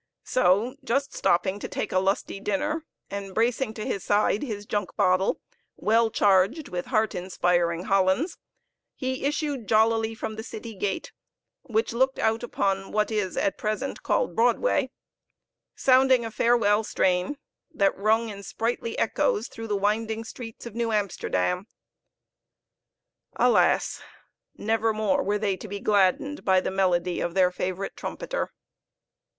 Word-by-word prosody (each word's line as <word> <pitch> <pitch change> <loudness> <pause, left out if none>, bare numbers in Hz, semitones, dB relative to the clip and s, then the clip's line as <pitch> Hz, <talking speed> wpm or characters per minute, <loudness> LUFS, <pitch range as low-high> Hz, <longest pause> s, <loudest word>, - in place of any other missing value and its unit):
So 230 +4 +2
just 275 +2 -1
stopping 190 +3 +1
to - - -5
take - - -4
a 185 - +3
lusty 195 +1 -1
dinner, 300 +9 -2 0.2
and 195 -1 -6
bracing 230 0 +1
to 215 - -5
his 195 - -2
side 205 0 +2
his 210 -7 -5
junk 205 -2 -3
bottle, 185 +1 +2 0.4
well 225 +1 +3
charged 205 - +2
with 175 +3 -4
heart 220 -3 +1
inspiring 175 -1 0
Hollands, 195 - +1 0.6
he 260 -1 -3
issued 285 -5 -2
jollily 225 0 +3
from 220 0 -5
the - - -3
city 225 0 -8
gate, 195 0 -3 0.5
which 225 -5 -1
looked 265 +3 +2
out 225 +1 +1
upon 195 -5 -1
what 210 +1 +1
is 205 -4 -1
at 195 - 0
present 215 +6 -3
called - - 0
Broadway; 245 - +2 0.9
sounding 260 -2 +4
a 225 - -5
farewell 220 -2 +3
strain, 185 +6 0 0.3
that 195 -1 +2
rung 220 +3 +2
in 200 -1 -7
sprightly 230 +3 -3
echoes 220 0 +1
through 225 0 -7
the 205 -2 0
winding 220 +2 0
streets 225 0 -9
of 235 - -7
New 230 0 -1
Amsterdam. 190 - -1 1.7
Alas! - - +3 0.6
never 225 +1 +1
more 220 +7 +1
were 210 -5 0
they 205 -2 0
to 215 - -9
be 200 0 -5
gladdened 205 +9 +1
by 190 -1 +4
the 185 - -3
melody 180 -2 +1
of 175 +1 -2
their 185 -1 +4
favorite 185 +1 -3
trumpeter. - - -4
215 Hz, 145 wpm, -26 LUFS, 195-235 Hz, 1.7 s, sounding